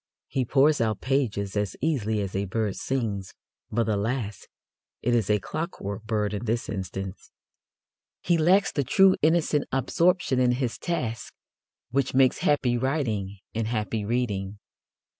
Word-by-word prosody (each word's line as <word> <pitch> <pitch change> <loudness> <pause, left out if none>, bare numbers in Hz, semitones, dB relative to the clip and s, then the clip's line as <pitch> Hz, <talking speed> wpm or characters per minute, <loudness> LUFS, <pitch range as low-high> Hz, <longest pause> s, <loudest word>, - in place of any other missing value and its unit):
He 130 -2 -1
pours 145 +4 +4
out 110 -3 0
pages 110 -8 -1
as 105 -1 -1
easily 110 -9 0
as 95 -2 -4
a 100 +1 0
bird 105 0 -1
sings, 110 -8 -3 0.4
but, 115 +1 +1
alas! 105 0 -2 0.6
it 120 - +2
is 115 -5 +1
a 105 - +4
clockwork 105 - -5
bird 105 -2 0
in 105 +3 -3
this 115 +1 -1
instance. 95 -1 -5 0.9
He 175 - +3
lacks 180 +5 +4
the 140 - 0
true 190 +8 +5
innocent 155 -2 +2
absorption 165 +1 +2
in 125 -1 +4
his 125 -2 -2
task 115 -10 -3 0.6
which 135 0 0
makes 130 -1 +4
happy 125 -5 +2
writing 115 -8 -1 0.2
and 115 0 -1
happy 110 -1 -2
reading. 105 -3 -2
115 Hz, 140 wpm, -26 LUFS, 105-135 Hz, 0.9 s, true